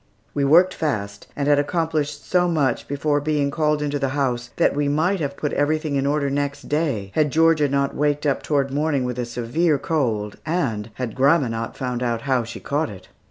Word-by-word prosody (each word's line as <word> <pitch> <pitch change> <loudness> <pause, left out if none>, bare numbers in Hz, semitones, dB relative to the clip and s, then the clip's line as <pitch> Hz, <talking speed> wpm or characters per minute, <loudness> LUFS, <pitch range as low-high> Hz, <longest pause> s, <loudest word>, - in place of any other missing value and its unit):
We 145 - 0
worked 175 +6 +5
fast, 100 -10 -3
and 140 0 -1
had 145 -1 +4
accomplished 150 -1 -1
so 180 -1 +3
much 150 -6 0
before 145 +1 0
being 145 -1 0
called 150 0 +1
into 145 0 -1
the 135 - 0
house 125 -3 -1
that - - +2
we 145 0 +1
might 165 +7 +1
have 140 -3 -3
put 150 - -2
everything 155 0 0
in 135 0 +1
order 140 -1 0
next 140 0 -2
day, 140 -11 -1
had 150 -1 +2
Georgia 160 -2 +4
not 140 0 0
waked 150 0 0
up 140 -2 +1
toward 140 -2 0
morning 145 -1 0
with 125 0 -3
a 120 - -1
severe 125 +7 0
cold, 115 -9 -1
and 130 -11 -1
had 125 -4 -4
grandma 140 0 +3
not 115 0 -4
found 125 -2 -3
out 120 -2 -1
how 130 -3 +1
she 115 0 -8
caught 150 +2 -1
it. 95 -2 -12
145 Hz, 205 wpm, -22 LUFS, 125-155 Hz, -, worked